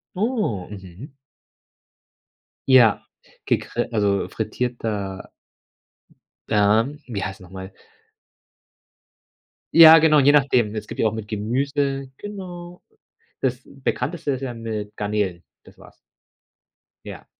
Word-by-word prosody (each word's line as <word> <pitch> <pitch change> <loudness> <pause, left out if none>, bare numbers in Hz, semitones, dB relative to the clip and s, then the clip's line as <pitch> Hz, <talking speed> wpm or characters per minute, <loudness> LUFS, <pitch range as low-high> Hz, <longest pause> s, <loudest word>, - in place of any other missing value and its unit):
Oh, 205 - -1
mhm. 95 - -11 1.6
Ja, 125 -5 +5 0.4
gegrill - - -1
also, 100 -3 +1
frittierter 105 -6 -4 1.2
ähm, 110 +8 +2
wie 105 -6 -4
heißt 95 +1 -6
noch 90 -2 -14
mal? 95 0 -9 2.0
Ja, 160 -1 +10
genau, 155 -1 +4
je 140 +2 +5
nachdem. 125 -7 +2
Es 110 - -5
gibt - - -6
ja - - +3
auch 110 - -5
mit 110 -2 -6
Gemüse, 135 +5 -2
genau. 180 -4 -9 0.6
Das 130 -1 -1
bekannteste 140 +2 -3
ist 130 0 -4
ja 130 - -3
mit 110 -3 -6
Garnelen, 100 -4 -2 0.2
das - - -18
war's. - - -17 1.1
Ja. - - -9
115 Hz, 105 wpm, -22 LUFS, 105-140 Hz, 2.0 s, Ja